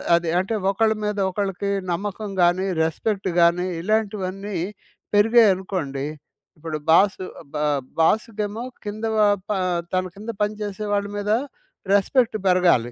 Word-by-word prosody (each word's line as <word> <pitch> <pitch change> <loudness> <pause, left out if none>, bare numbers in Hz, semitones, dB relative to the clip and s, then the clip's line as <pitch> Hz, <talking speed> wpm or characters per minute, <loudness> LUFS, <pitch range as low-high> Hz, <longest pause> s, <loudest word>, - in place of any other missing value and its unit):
అది 170 -1 0
అంటే, 195 +4 -1 0.2
ఒకళ్ళ 220 +2 +2
మీద 210 -1 -1
ఒకళ్ళకి 200 0 -2 0.2
నమ్మకం 205 +3 -4
గాని, 175 +2 +3 0.2
రెస్పెక్ట్ 195 +5 -1
గాని 170 +1 +4 0.2
ఇలాంటివన్నీ 200 -1 -1 0.6
పెరిగాయనుకోండి. 190 - +3 0.5
ఇప్పుడు 155 0 -4
బాసు 190 +3 +4 0.2
అ - - -14
బ - - -3 0.4
బాసుకేమో 210 +4 +1 0.2
కింద 215 +2 -4
వ - - 0 0.3
ప - - -3 0.4
తన 185 - +2
కింద 210 +3 -9
పని 210 0 +1
చేసే 205 0 -4
వాళ్ళ 200 0 +1
మీద 205 +1 -1 0.6
రెస్పెక్ట్ 225 +4 +3
పెరగాలి. 175 -10 +3
200 Hz, 125 wpm, -23 LUFS, 180-210 Hz, 0.6 s, గాని